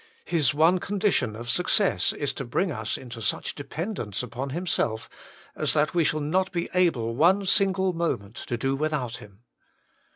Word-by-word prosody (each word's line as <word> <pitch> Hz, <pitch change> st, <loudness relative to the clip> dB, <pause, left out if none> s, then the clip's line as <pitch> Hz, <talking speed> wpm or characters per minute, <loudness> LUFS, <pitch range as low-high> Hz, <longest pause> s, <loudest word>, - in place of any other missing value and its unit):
His 155 Hz, -8 st, +3 dB
one 165 Hz, +5 st, +4 dB
condition 195 Hz, -, 0 dB
of 120 Hz, +2 st, -8 dB
success, 180 Hz, -, +2 dB
is 145 Hz, -2 st, -2 dB
to 135 Hz, -, -5 dB
bring 170 Hz, +9 st, -1 dB
us 110 Hz, -5 st, -2 dB
into 120 Hz, -2 st, -9 dB
such 100 Hz, -, -1 dB
dependence 145 Hz, -, -4 dB
upon 125 Hz, +3 st, -5 dB
Himself 145 Hz, -8 st, -1 dB, 0.5 s
as -, -, +1 dB
that 150 Hz, +2 st, +2 dB
we 170 Hz, -1 st, +3 dB
shall 155 Hz, 0 st, 0 dB
not 185 Hz, +6 st, 0 dB
be 170 Hz, -2 st, -2 dB
able 150 Hz, -11 st, +2 dB
one 185 Hz, +8 st, +4 dB
single 190 Hz, -1 st, +2 dB
moment 115 Hz, -11 st, -2 dB
to 120 Hz, -, -2 dB
do 135 Hz, +3 st, 0 dB
without 140 Hz, -5 st, -2 dB
Him. 105 Hz, +1 st, -15 dB
150 Hz, 165 wpm, -26 LUFS, 120-180 Hz, 0.5 s, one